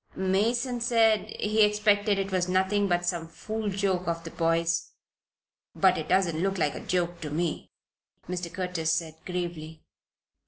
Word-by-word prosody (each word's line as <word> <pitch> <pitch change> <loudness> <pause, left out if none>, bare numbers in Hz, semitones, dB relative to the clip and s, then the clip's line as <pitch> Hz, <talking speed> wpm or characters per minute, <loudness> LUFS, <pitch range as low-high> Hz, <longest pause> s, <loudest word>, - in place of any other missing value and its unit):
"Mason 230 +6 0
said 225 -3 +3
he 215 +1 +2
expected 210 -1 +3
it 195 0 -2
was 185 -1 0
nothing 190 +2 +2
but 175 -1 +1
some 170 -2 -2
fool 215 +5 -4
joke 190 -2 -1
of 165 0 -2
the 165 - -7
boys. 165 0 0 0.8
But 190 -1 +4
it 155 -2 -5
doesn't 175 -4 +2
look 195 +1 0
like 150 -4 +1
a - - -6
joke 175 -1 -2
to 155 - -4
me," 165 +2 -2 0.6
Mr. 180 -1 -4
Curtis 180 -3 -1
said, 160 -1 -1
gravely. 170 -3 -5
185 Hz, 155 wpm, -27 LUFS, 170-205 Hz, 0.8 s, But